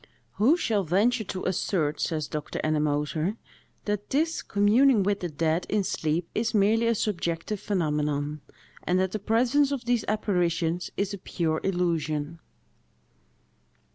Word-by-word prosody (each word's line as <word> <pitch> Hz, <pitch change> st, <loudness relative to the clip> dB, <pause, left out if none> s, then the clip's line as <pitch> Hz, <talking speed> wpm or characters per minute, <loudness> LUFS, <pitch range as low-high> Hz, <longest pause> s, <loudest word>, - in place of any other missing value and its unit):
"Who 265 Hz, +11 st, +4 dB
shall 215 Hz, -, 0 dB
venture 215 Hz, +8 st, +2 dB
to 185 Hz, -1 st, -5 dB
assert," 170 Hz, -5 st, 0 dB
says 155 Hz, -3 st, -1 dB
Dr. 150 Hz, -1 st, -5 dB
Ennemoser, 155 Hz, +5 st, 0 dB, 0.5 s
"that 205 Hz, -1 st, -2 dB
this 320 Hz, +4 st, 0 dB
communing 215 Hz, +3 st, +4 dB
with 200 Hz, +1 st, 0 dB
the 175 Hz, -, -3 dB
dead 160 Hz, +2 st, 0 dB
in 210 Hz, -1 st, +1 dB
sleep 165 Hz, -1 st, -1 dB
is 225 Hz, 0 st, -1 dB
merely 220 Hz, +3 st, +3 dB
a 230 Hz, -, +2 dB
subjective 185 Hz, -1 st, -2 dB
phenomenon, 150 Hz, -6 st, -1 dB, 0.4 s
and 180 Hz, +1 st, +1 dB
that 190 Hz, -1 st, +1 dB
the 215 Hz, -, -3 dB
presence 250 Hz, +7 st, +2 dB
of 265 Hz, -4 st, -3 dB
these 240 Hz, -2 st, +1 dB
apparitions 175 Hz, -5 st, 0 dB
is 200 Hz, 0 st, -1 dB
a 200 Hz, -, -6 dB
pure 160 Hz, -3 st, -2 dB
illusion?" 165 Hz, -4 st, -1 dB
185 Hz, 140 wpm, -27 LUFS, 160-215 Hz, 0.5 s, Who